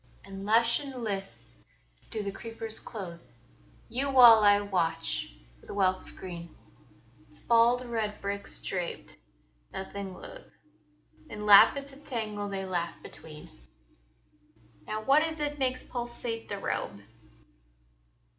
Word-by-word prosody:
And 195 0 -8
lush 230 +3 +3
and 270 -4 -7
lithe 195 -3 -2 0.8
do 215 - -3
the 200 - -3
creepers 225 +1 -7
clothe 175 -6 -8 0.7
Yon 275 +2 -2
wall 235 -4 +9
I 205 0 +6
watch, 165 - -2 0.2
with - - -19
a - - -6
wealth 185 -2 +2
of - - -14
green: 170 -3 -8 0.7
Its 150 - -14
bald 240 +2 +3
red 220 -3 -2
bricks 200 0 -2
draped, 180 -3 -4 0.5
nothing 195 0 -6
loath, - - -12 0.7
In 210 0 -6
lappets 275 +7 +7
of 285 +2 -15
tangle 215 -5 -3
they 195 -1 -3
laugh 175 -2 -2
between. 155 -1 -11 1.4
Now, 215 0 -3
what 275 +6 +5
is 320 0 -2
it 295 0 -2
makes 255 -1 0
pulsate 240 -2 -5
the 200 - -3
robe? 105 - -3
210 Hz, 125 wpm, -29 LUFS, 195-240 Hz, 1.4 s, wall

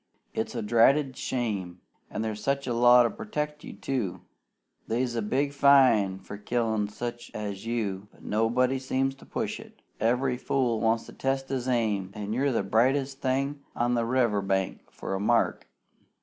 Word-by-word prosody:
It's 110 - -3
a 115 - -2
dratted 130 +5 +4
shame! 100 -10 -3 0.3
An' 110 - -3
there's 110 0 -4 0.2
law 120 0 +6
to 115 - +2
protect 150 -9 -4
you, - - -8
too. 120 -10 -3 0.7
They's 120 +1 -1
a 115 - 0
good 105 - -5
big 140 +1 +1
fine 130 -9 +5
for 100 +1 -9
killin' 110 -1 0
such 120 +3 -6
as 105 0 -5
you, 105 -4 -2
but - - -21
nobody 120 +5 +1
seems 135 +1 0
to 135 - -17
push - - -3
it. - - -15 0.2
Every 125 +3 +1
fool 125 -4 0
wants 115 0 +1
to - - -12
test 135 0 -2
his 130 -2 -2
aim, 110 -6 0
an' 105 0 -4
you're 135 +4 +1
the 115 - 0
brightest 130 +6 +1
thing 140 +2 -1
on 120 +1 +1
the 115 -1 +1
river 120 -5 +2
bank 95 -1 -2
for - - -6
a 95 - -1
mark. 115 +4 +1
120 Hz, 170 wpm, -27 LUFS, 105-130 Hz, 0.7 s, law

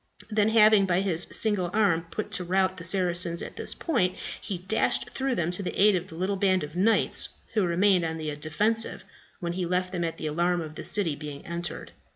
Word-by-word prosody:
Then 210 0 +2
having, 215 -3 +5
by 180 0 +2
his 180 -3 +2
single 205 -5 +1
arm, 185 -6 +2
put 215 - -5
to 180 - +1
rout 185 +1 +1
the 170 - -8
Saracens 175 -1 +2
at - - -8
this - - -4
point, 215 - 0 0.3
he 195 -4 -4
dashed 190 +5 0
through 265 -1 -1
them 170 0 -1
to 180 - 0
the 185 - -5
aid 205 0 +5
of 180 0 -3
the 165 - -11
little 190 +4 -1
band 185 -2 +2
of 150 +2 -8
knights 210 +5 +2 0.2
who 215 - +2
had 180 - 0
remained 185 +1 +3
on 160 0 -3
the 155 -2 -4
defensive 210 +10 -1 0.4
when 170 -1 -3
he 180 -1 -2
left 180 +1 -1
them 175 -2 -2
at 165 -1 -3
the - - -6
alarm 175 +3 0
of 155 -2 -6
the - - -8
city 180 -8 +1
being 145 -1 -8
entered. 170 +1 -5
180 Hz, 220 wpm, -26 LUFS, 170-200 Hz, 0.4 s, having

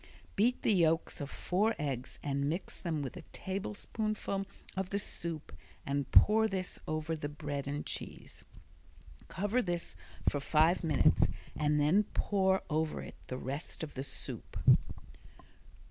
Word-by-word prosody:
Beat 240 +5 +2
the 220 - +4
yolks 165 -4 +2
of 140 - -4
four 210 +9 +1
eggs 135 -3 -3
and 140 0 0
mix 170 +4 -4
them 160 -5 -1
with 135 - -5
a 180 - -7
tablespoonful 200 +1 -3 0.3
of 190 -1 -1
the 200 - 0
soup 165 - -3 0.3
and 140 -1 -1
pour 220 +1 +7
this 190 -3 -2
over 155 +1 -1
the 145 -2 -4
bread 145 -2 -4
and 145 +1 -2
cheese. - - -6 0.8
Cover 205 +7 +1
this 175 -5 -2 0.3
for 145 - +3
five 160 +5 +3
minutes 155 -4 +4 0.3
and 150 0 +2
then 170 +9 +4
pour 190 -2 +2
over 155 0 0
it - - -10
the 130 - -3
rest 140 +6 -4
of 155 - -5
the 135 - -3
soup. 135 - -5
165 Hz, 145 wpm, -33 LUFS, 145-195 Hz, 0.8 s, pour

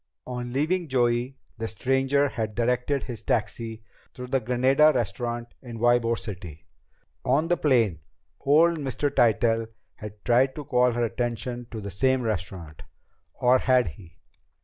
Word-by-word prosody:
On 125 -1 -5
leaving 160 +7 0
Joey, 125 0 0 0.2
the 115 - -2
stranger 135 +4 +1
had 110 -4 -4
directed 125 +4 0
his 120 -4 -7
taxi 115 0 -2 0.3
to 125 - -6
the 130 +1 0
Granada 130 +5 +4
Restaurant 120 +1 -3
in 120 -3 -8
Ybor 115 0 +2
City! 90 -8 -8 0.6
On 140 +6 +2
the 175 - +4
plane, 120 - +2 0.4
old 160 +4 +4
Mr. 140 +1 -2
Tytell 115 -1 +2 0.3
had 105 -1 -11
tried 125 +2 +3
to 150 - -6
call 125 -3 +2
her 120 0 0
attention 120 +1 -3
to 115 - -6
the 100 -1 -6
same 130 +6 +1
restaurant 90 -7 -4 0.5
or 125 +1 +4
had 125 -6 +3
he? 85 +2 -15
120 Hz, 145 wpm, -26 LUFS, 115-130 Hz, 0.6 s, Granada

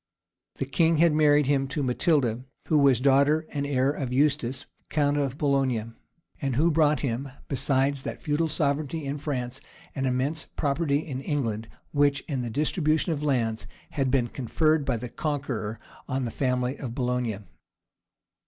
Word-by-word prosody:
[*] - - -63
The - - -2
king 165 +4 +2
had 165 0 +4
married 150 -1 +4
him 135 0 +1
to 140 +2 -2
Matilda, 125 -2 +1 0.3
who 155 - +4
was 135 -4 +5
daughter 140 +4 +3
and 140 -1 -2
heir 135 -1 +2
of 135 -4 -4
Eustace, 135 -2 +1 0.2
count 145 -1 +1
of 140 -2 -1
Boulogne, 130 -6 0 0.5
and 135 -4 -1
who 160 +6 +3
brought 150 -1 +3
him, 135 +1 -2 0.2
besides 135 0 +1
that - - -5
feudal 155 +2 0
sovereignty 150 0 -1
in 140 +1 -3
France, 130 -3 -3 0.3
an 135 -1 -1
immense 135 +5 0
property 145 0 0
in 130 -4 -4
England, 115 -7 -2 0.2
which, 145 -1 +2
in 135 -5 -3
the 120 - -3
distribution 155 +5 +1
of 145 - -4
lands, 120 -7 0 0.2
had 135 -3 0
been 125 -2 +2
conferred 155 +5 +1
by 130 -4 0
the 125 +2 -5
Conqueror 125 -7 -3 0.3
on 130 0 -1
the 115 - -3
family 125 +1 -1
of 120 -4 -5
Boulogne. 125 -5 -1
140 Hz, 160 wpm, -26 LUFS, 125-150 Hz, 0.5 s, was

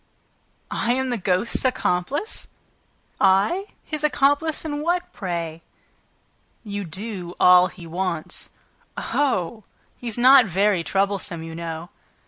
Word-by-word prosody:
"I 235 - +1
am 260 0 -1
the 240 - 0
ghost's 185 +4 0
accomplice? 255 - 0 0.7
I?... 200 - +3 0.2
His 305 -1 -4
accomplice 300 +2 +2
in 295 -1 -3
what, 350 +3 -1
pray?" 170 -4 -4 1.0
"You 205 -2 -4
do 180 0 -6
all 180 0 +7
he 180 -3 -12
wants." 170 -1 -3 0.5
"Oh! 225 -7 -1 0.3
He's 235 -2 -3
not 255 -1 +7
very 195 0 +2
troublesome, 195 -3 -1
you 165 0 -7
know." 165 0 -6
200 Hz, 110 wpm, -23 LUFS, 180-265 Hz, 1.0 s, all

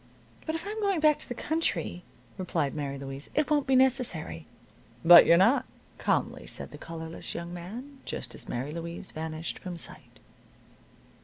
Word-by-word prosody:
"But 315 - -1
if 325 - -5
I'm 425 +2 -4
going 395 -4 +1
back 305 -1 +4
to - - -9
the 245 - -4
country," 230 - -1 0.4
replied 165 -6 -1
Mary 140 -2 -3
Louise, 135 +1 -5
"it 300 +1 +1
won't 290 -2 +2
be 265 - +4
necessary." 235 - +2 0.6
"But 170 0 +10
you're 170 - +7
not," 225 +10 +4 0.3
calmly - - 0
said - - -1
the - - -10
collarless 165 0 -7
young 170 +1 -5
man, 235 +11 -8
just - - -5
as - - -7
Mary 130 +5 -3
Louise 170 +3 -6
vanished 160 +1 -4
from 180 -3 -6
sight. - - -3
175 Hz, 165 wpm, -29 LUFS, 160-270 Hz, 0.6 s, But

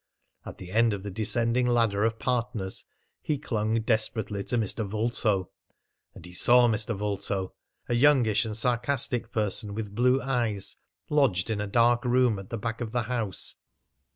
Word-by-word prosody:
At - - -8
the 90 0 -10
end 115 +1 +3
of 100 -1 -5
the 100 - -5
descending 115 +4 +2
ladder 115 -4 +2
of 115 0 -1
partners 115 -4 -2 0.4
he 150 - -1
clung 110 -5 -1
desperately 110 -2 -1
to 120 - -1
Mr. 110 0 -1
Vulto, 105 -2 -1 0.6
and 85 - -12
he 90 - -12
saw 120 +6 +5
Mr. 110 0 -1
Vulto 100 -2 -3 0.3
a - - -1
youngish 120 -5 +4
and 110 -2 -2
sarcastic 120 0 +1
person 105 -1 0
with 105 -2 -5
blue 125 +4 +3
eyes, 120 -7 -2 0.3
lodged 120 -10 +2
in 105 -2 -2
a 105 - -3
dark 120 +3 +3
room 125 -4 +2
at 95 - -11
the 115 - -4
back 115 +2 -4
of 115 -2 -4
the 120 -2 0
house. 115 -4 -2
115 Hz, 165 wpm, -27 LUFS, 105-120 Hz, 0.6 s, saw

